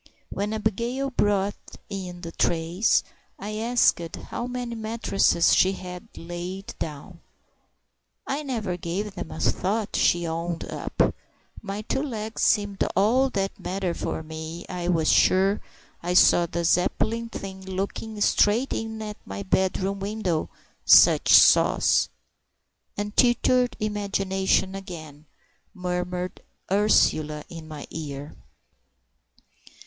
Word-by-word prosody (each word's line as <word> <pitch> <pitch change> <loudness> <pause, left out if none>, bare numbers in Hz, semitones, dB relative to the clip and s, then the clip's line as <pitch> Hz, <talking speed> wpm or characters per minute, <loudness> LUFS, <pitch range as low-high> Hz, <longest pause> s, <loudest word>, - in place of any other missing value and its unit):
When 205 +1 -2
Abigail 235 +5 -1
brought 205 -4 +1 0.3
in 185 -3 -6
the 165 -1 -6
trays, 170 +5 +1 0.3
I 210 +2 -5
asked 225 -7 +2
how 240 - -6
many 245 -1 -4
mattresses 220 -6 +2
she 190 +1 +4
had 180 -1 -8
laid 175 +3 -6
down. 160 +3 -6 1.1
"I 280 +2 -2
never 225 -11 -3
gave 190 +4 -4
'em 175 - -6
a - - -7
thought," 205 +6 0
she 175 0 +3
owned 165 +1 -3
up; - - -1 0.5
"my 205 0 -5
two 265 - -1
legs 225 -6 -4
seemed 205 -2 +2
all 240 +8 +3
that 195 -5 -3
mattered, 185 -2 -2
for 160 - -4 0.4
I 180 -2 -4
was 160 -2 +1
sure 195 +2 +4 0.4
I 180 +1 -2
saw 175 -1 +6
the 170 +1 -3
Zeppelin 225 +7 +1
thing 190 -3 -7
looking 195 +3 -4
straight 220 +6 +3
in 220 -1 -4
at 210 -1 -6
my 95 +1 -6
bedroom 190 - 0
window—such 195 -5 +3
sauce!" - - +5 0.9
"Untutored 240 +4 +2
imagination 195 -2 0
again!" 155 -6 -9 0.5
murmured 180 0 -3 0.3
Ursula 155 -7 +2
in 165 -2 -9
my 150 -2 -8
ear. 145 -2 -6
195 Hz, 110 wpm, -25 LUFS, 175-215 Hz, 1.1 s, saw